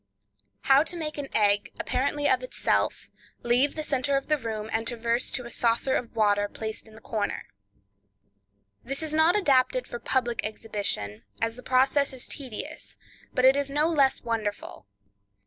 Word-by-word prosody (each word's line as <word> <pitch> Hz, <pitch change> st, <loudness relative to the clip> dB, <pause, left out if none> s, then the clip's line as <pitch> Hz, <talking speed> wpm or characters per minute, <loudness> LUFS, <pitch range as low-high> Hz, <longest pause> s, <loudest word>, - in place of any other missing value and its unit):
How 270 Hz, +1 st, +5 dB
to 330 Hz, +3 st, -2 dB
Make 305 Hz, -3 st, -4 dB
an 280 Hz, -, -4 dB
Egg, 205 Hz, -1 st, +3 dB
Apparently 285 Hz, +3 st, 0 dB
of 255 Hz, -, +3 dB
Itself, 255 Hz, -, -1 dB, 0.3 s
Leave 245 Hz, +4 st, +2 dB
the 310 Hz, -, -3 dB
Center 275 Hz, -1 st, +1 dB
of 275 Hz, -, -5 dB
the 305 Hz, -, +3 dB
Room 220 Hz, -3 st, -4 dB
and 225 Hz, +1 st, -1 dB
Traverse 235 Hz, 0 st, 0 dB
to 250 Hz, -, -3 dB
a 235 Hz, -, -8 dB
Saucer 235 Hz, +3 st, +2 dB
of 240 Hz, -, -3 dB
Water 205 Hz, -2 st, +2 dB
Placed 220 Hz, +1 st, -6 dB
in 220 Hz, -, -16 dB
the 220 Hz, -, -14 dB
Corner.—This 100 Hz, -, -7 dB
is 310 Hz, -1 st, -3 dB
not 315 Hz, +4 st, +4 dB
adapted 300 Hz, -, +3 dB
for 240 Hz, -, -7 dB
public 240 Hz, -1 st, 0 dB
exhibition, 205 Hz, -, -3 dB, 0.2 s
as 225 Hz, 0 st, -1 dB
the 250 Hz, -, -10 dB
process 265 Hz, +2 st, +3 dB
is 255 Hz, -, -4 dB
tedious, 255 Hz, -7 st, -6 dB, 0.3 s
but 255 Hz, -, +2 dB
it 265 Hz, +1 st, +7 dB
is 280 Hz, -1 st, -1 dB
no 295 Hz, +3 st, +2 dB
less 280 Hz, -5 st, +2 dB
wonderful. 215 Hz, -, -4 dB
240 Hz, 165 wpm, -27 LUFS, 210-275 Hz, 0.3 s, it